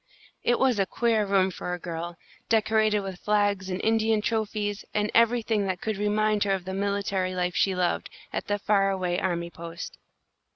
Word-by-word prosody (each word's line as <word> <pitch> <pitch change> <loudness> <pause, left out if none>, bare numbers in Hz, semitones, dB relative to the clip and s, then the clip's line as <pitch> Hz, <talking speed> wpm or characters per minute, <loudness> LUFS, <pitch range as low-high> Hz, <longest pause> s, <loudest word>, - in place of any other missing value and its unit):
It 240 - +3
was 255 -5 +2
a 195 - +2
queer 225 0 +1
room 190 -1 +3
for 180 0 -4
a - - -10
girl, 170 0 -5 0.3
decorated 220 -1 +3
with 190 -2 -6
flags 205 -2 +1
and 185 0 -2
Indian 220 0 +3
trophies 210 -2 -1
and 210 0 +1
everything 225 -3 +3
that 185 -2 -2
could 220 0 -2
remind 210 0 +2
her 200 -1 +1
of 190 -2 -3
the 190 - -4
military 200 -2 -1
life 180 -1 -1
she 190 -1 +2
loved, 180 -1 0 0.2
at - - -3
the 205 - +1
far 200 -1 +2
away 180 -2 0
army 170 -2 -2
post. 170 +1 -8
200 Hz, 180 wpm, -27 LUFS, 185-215 Hz, 0.3 s, It